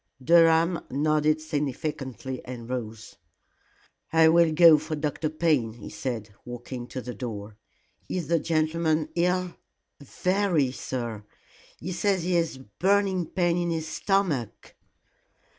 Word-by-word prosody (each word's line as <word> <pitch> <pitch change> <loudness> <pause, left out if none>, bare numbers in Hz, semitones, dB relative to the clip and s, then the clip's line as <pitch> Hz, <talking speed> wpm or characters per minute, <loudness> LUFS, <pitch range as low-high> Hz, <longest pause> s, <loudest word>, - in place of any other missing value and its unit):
Durham 165 +2 +5
nodded 155 +2 +1
significantly 140 -4 -4
and 120 -2 -8
rose. 115 -3 -6 0.9
"I 160 0 +6
will 165 0 +5
go 160 -1 +7
for 155 +1 -4
Dr. 150 +1 -2
Payne," 155 -8 +1
he 115 - -10
said, 110 -1 -5
walking 120 0 -7
to 130 - -6
the 125 0 -6
door. 105 -2 -6 0.5
"Is 180 -2 -3
the 170 0 +2
gentleman 155 0 0
ill?" 180 +1 0 0.5
"Very, 175 -1 0
sir. 120 -5 -5 0.5
He 185 - -6
says 190 0 0
he 180 +1 0
has 165 -4 +1
a - - -12 0.2
burning 190 -2 +2
pain 175 -2 +1
in 175 0 -1
his 160 -1 -2
stomach." 155 - -1
155 Hz, 125 wpm, -26 LUFS, 130-170 Hz, 0.9 s, go